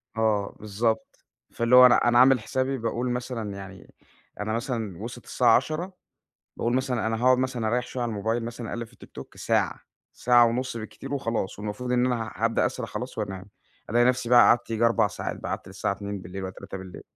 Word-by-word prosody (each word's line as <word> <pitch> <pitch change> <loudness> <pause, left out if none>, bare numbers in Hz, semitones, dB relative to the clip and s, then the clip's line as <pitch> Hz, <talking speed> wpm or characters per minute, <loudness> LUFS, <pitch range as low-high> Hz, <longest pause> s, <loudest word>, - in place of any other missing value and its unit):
آه 110 -3 0
بالضبط، 110 +2 -2 0.3
فاللي 115 +2 +3
هو 125 0 +10
أنا 125 - +7
أنا 120 0 +5
عامل 130 -1 +6
حسابي 130 +4 -1
باقول 115 +1 -2
مثلًا 120 -4 -3
يعني 95 -1 -11 0.5
أنا 110 +1 -2
مثلًا 115 -6 -3
وصلِت 120 +1 -8
الساعة 120 -3 +4
22:00، 155 +8 -1 0.6
باقول 120 +1 0
مثلًا 130 -3 0
أنا 115 - 0
هاقعُد 130 0 +5
مثلًا 130 -3 -1
اريح 125 +2 0
شوية 125 - -4
على 120 - -1
الموبايل، 110 +3 -1
مثلًا 120 0 -6
اقلّب 115 0 -4
في - - -23
الtiktok - - -11
ساعة، - - 0 0.3
ساعة 120 -1 +5
ونص 125 +1 -2
بالكتير 125 +5 -6
وخلاص 115 -8 -2
والمفروض 105 +5 -4
إن 125 0 +3
أنا 115 -3 -2
هابدأ 115 +1 +1
اسرح 120 -2 -4
خلاص 125 -1 -6
وأنام، 95 -3 -4 0.5
ألاقي 120 +2 +4
نفسي 125 -1 +1
بقى 120 0 +7
قعدت 120 -1 +4
ييجي 115 +1 +1
4 115 0 +4
ساعات - - -5
بقى، - - -7
قعدت - - -5
للساعة 95 +1 -2
02:00 100 -1 -6
والاّ 95 0 -6
03:00. 95 -1 -9
115 Hz, 190 wpm, -26 LUFS, 110-125 Hz, 0.6 s, هو